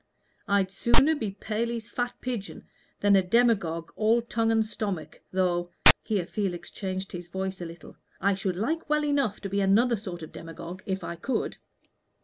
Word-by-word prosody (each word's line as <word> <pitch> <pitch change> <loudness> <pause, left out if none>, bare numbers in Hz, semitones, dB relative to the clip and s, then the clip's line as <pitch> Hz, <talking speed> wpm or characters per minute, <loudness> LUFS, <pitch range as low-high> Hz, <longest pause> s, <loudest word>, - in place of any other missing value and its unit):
I'd 200 -2 +2
sooner 270 +9 +4
be 230 -9 -2
Paley's 230 +1 -2
fat 245 0 -1
pigeon 240 -6 -5 0.4
than 205 0 +5
a 195 - +6
demagogue 180 -6 +2
all 225 +2 +3
tongue 225 -1 0
and 225 -1 +3
stomach, 205 -6 -4
though" 175 -2 +1 0.3
here 200 -5 -1
Felix 190 -2 -3
changed 190 -1 -4
his 175 -1 -7
voice 190 +1 -4
a - - -3
little 165 0 -12 0.2
"I 200 +1 +3
should 190 -1 -2
like 300 - -2
well 300 0 +2
enough 280 -8 +1
to 195 - -4
be 200 +1 0
another 225 +5 +4
sort 185 -5 -7
of 160 - -9
demagogue, 170 +2 -8
if 190 -1 -2
I 170 - -5
could." 255 +10 -2
200 Hz, 170 wpm, -27 LUFS, 185-230 Hz, 0.4 s, a